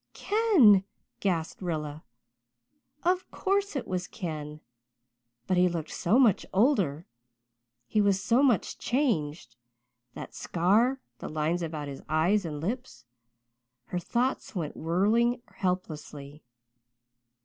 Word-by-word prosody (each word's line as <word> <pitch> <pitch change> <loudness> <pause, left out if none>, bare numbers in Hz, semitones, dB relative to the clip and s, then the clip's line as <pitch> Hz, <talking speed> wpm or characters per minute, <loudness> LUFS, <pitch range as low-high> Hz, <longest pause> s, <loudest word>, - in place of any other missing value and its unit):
"Ken," 360 - +5 0.4
gasped 170 -4 -1
Rilla. 155 -4 -4 1.0
Of 365 +1 +1
course, 395 -2 -1
it 275 - -3
was 180 -1 -2
Ken 150 -3 -6 0.9
but 185 - +1
he 180 0 +5
looked 165 -2 -4
so 200 +8 +2
much 235 -8 +4
older 190 - +2 0.8
he 210 - +1
was 200 -2 +3
so 230 +6 +2
much 250 -9 +2
changed 155 - -1 0.6
that - - -8
scar 215 +10 +2 0.2
the - - -6
lines 155 +3 -1
about 155 -3 -4
his 140 -1 -7
eyes 175 +6 +2
and 150 -3 -4
lips 170 - -5 0.8
her 180 - -2
thoughts 240 +7 -1
went 160 -5 -3
whirling 225 +9 +1
helplessly. 155 -6 -4
180 Hz, 115 wpm, -28 LUFS, 155-235 Hz, 1.0 s, Ken